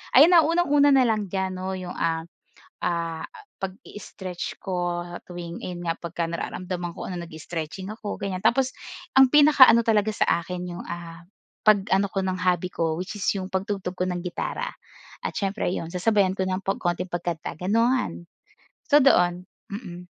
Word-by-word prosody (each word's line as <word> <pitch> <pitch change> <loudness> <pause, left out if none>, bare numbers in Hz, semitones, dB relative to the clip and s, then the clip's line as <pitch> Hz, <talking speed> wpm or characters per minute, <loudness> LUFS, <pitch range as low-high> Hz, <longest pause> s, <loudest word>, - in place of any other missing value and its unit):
Ayan 295 +7 +9
ah, 330 -3 +7
unang-una 290 -4 +4
na 265 - +6
lang 215 -4 +1
diyan 190 0 -2
'no, 190 +1 -3
'yong, 180 -1 -6
ah, 165 -1 0 0.6
ah, 165 -2 -2 0.4
pagi-stretch 190 -1 -7
ko 175 -2 -2 0.2
tuwing 175 -1 -7
ayun 175 -1 -5
nga, 165 - 0
pagka 170 0 -3
nararamdaman 175 +1 -4
ko, - - -7
ano 180 - -4
nagi-stretching 165 +3 -6
ako 215 -2 -6
gan'yan. 190 -2 -4
Tapos 260 +1 +2 0.4
ang 265 -1 +7
pinaka-ano 290 -5 +8
talaga 220 -2 +2
sa - - 0 0.2
akin 180 0 -5
'yong, 175 - -7
ah, 170 0 -8 0.4
pag-ano 200 -2 +3
ko 195 - 0
ng 185 -1 -1
hobby 180 0 +2
ko 165 -2 -1
which 190 +3 -5
is 205 - -4
'yong 190 -2 -4
pagtugtog 190 -1 -3
ko 180 - 0
ng 180 -1 -2
gitara. 175 -1 -3 0.6
At - - -2
siyempre 200 +1 -2
'yon, 165 - -3
sasabayan 190 +1 +2
ko 190 - 0
ng 185 0 -1
pag 195 0 -1
konting 175 +1 -2
pagkanta 175 -4 -4
gano'n. 225 0 0 0.6
So 295 -1 +6
doon. 180 -8 +3 0.2
Mm. 180 -5 -8
185 Hz, 165 wpm, -25 LUFS, 175-215 Hz, 0.6 s, Ayan